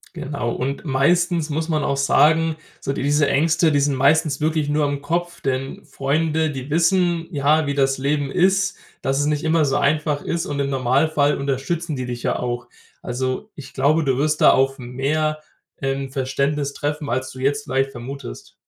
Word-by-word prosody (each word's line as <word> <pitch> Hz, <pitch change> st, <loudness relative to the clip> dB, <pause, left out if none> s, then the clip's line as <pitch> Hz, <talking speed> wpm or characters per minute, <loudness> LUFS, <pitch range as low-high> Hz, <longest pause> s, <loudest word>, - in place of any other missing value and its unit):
Genau. 135 Hz, -4 st, -3 dB
Und 135 Hz, +4 st, -3 dB
meistens 165 Hz, +4 st, +1 dB
muss 160 Hz, +3 st, -2 dB
man 155 Hz, -2 st, 0 dB
auch 140 Hz, -, 0 dB
sagen, 155 Hz, +3 st, +3 dB, 0.2 s
so -, -, -2 dB
diese 145 Hz, +2 st, +1 dB
Ängste, 160 Hz, +2 st, +3 dB
die 145 Hz, -, +3 dB
sind 140 Hz, -1 st, +1 dB
meistens 150 Hz, +3 st, +2 dB
wirklich 155 Hz, -1 st, +1 dB
nur 150 Hz, 0 st, +1 dB
im 140 Hz, 0 st, -2 dB
Kopf. 175 Hz, +4 st, -2 dB
Denn 135 Hz, 0 st, -3 dB
Freunde, 155 Hz, +3 st, 0 dB
die 135 Hz, 0 st, -7 dB
wissen, 170 Hz, +1 st, +2 dB
ja, 150 Hz, +2 st, +2 dB
wie 140 Hz, -, -1 dB
das 135 Hz, -1 st, +1 dB
Leben 140 Hz, +1 st, -1 dB
ist, 190 Hz, +4 st, +2 dB, 0.2 s
dass 135 Hz, +1 st, 0 dB
es 145 Hz, -, +1 dB
nicht 150 Hz, -1 st, 0 dB
immer 160 Hz, 0 st, +3 dB
so 135 Hz, -2 st, +1 dB
einfach 150 Hz, 0 st, +1 dB
ist. 170 Hz, +2 st, -2 dB
Und 140 Hz, -, -3 dB
im 140 Hz, 0 st, 0 dB
Normalfall 140 Hz, +3 st, +2 dB
unterstützen 140 Hz, +4 st, -2 dB
die 130 Hz, -, -4 dB
dich 120 Hz, -1 st, -6 dB
ja -, -, 0 dB
auch. 120 Hz, -1 st, -3 dB, 0.3 s
Also, 130 Hz, -, -3 dB
ich 145 Hz, -, -11 dB
glaube, 150 Hz, +4 st, +2 dB
du 135 Hz, -3 st, +1 dB
wirst 150 Hz, +2 st, 0 dB
da -, -, +8 dB
auf 135 Hz, +1 st, +2 dB
mehr, 145 Hz, +5 st, -1 dB, 0.4 s
ähm, 135 Hz, 0 st, -2 dB
Verständnis 140 Hz, +1 st, -1 dB
treffen, 150 Hz, 0 st, -3 dB
als 130 Hz, +2 st, -2 dB
du 130 Hz, -, -11 dB
jetzt 140 Hz, +2 st, 0 dB
vielleicht 135 Hz, 0 st, 0 dB
vermutest. 130 Hz, +1 st, -8 dB
145 Hz, 185 wpm, -21 LUFS, 135-155 Hz, 0.4 s, da